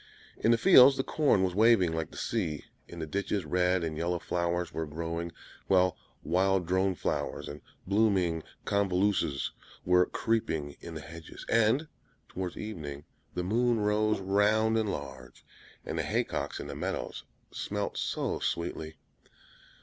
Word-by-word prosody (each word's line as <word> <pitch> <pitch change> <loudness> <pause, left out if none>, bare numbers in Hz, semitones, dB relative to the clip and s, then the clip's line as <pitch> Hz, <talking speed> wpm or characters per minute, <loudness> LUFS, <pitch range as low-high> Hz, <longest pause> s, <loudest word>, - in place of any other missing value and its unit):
In - - +2
the 115 - +5
fields 135 -2 +8
the 135 - +1
corn 140 -12 +2
was 90 -1 0
waving 105 -4 +5
like 80 -1 -2
the - - -12
sea; 85 -11 -2 0.2
in 85 - -10
the 80 - -3
ditches 100 +2 -2
red 90 +2 +1
and 80 -1 -2
yellow 85 +2 -1
flowers 85 0 -2
were 80 -1 -3
growing; 85 +2 -4 0.4
while 95 -2 +4 0.3
wild 95 +1 +2
drone 95 +2 +1
flowers, - - -2
and 75 0 -8 0.2
blooming 95 -5 +2 0.2
convolvuluses 95 -7 +1 0.3
were 90 0 +4
creeping 80 -11 -1
in 85 - -9
the 80 - -5
hedges; 85 +1 -10
and 115 +7 +3 0.4
towards 90 -2 -5
evening 75 -9 -6 0.3
the 90 - -1
moon 115 +4 +2
rose 105 0 +2
round 105 +3 +2
and 110 -2 +1
large, 65 -5 -7 0.4
and - - -3
the - - 0
haycocks - - -2
in - - -6
the - - -6
meadows - - -4 0.3
smelt - - -3
so - - -2
sweetly. 80 -2 -3
90 Hz, 150 wpm, -30 LUFS, 85-105 Hz, 0.4 s, fields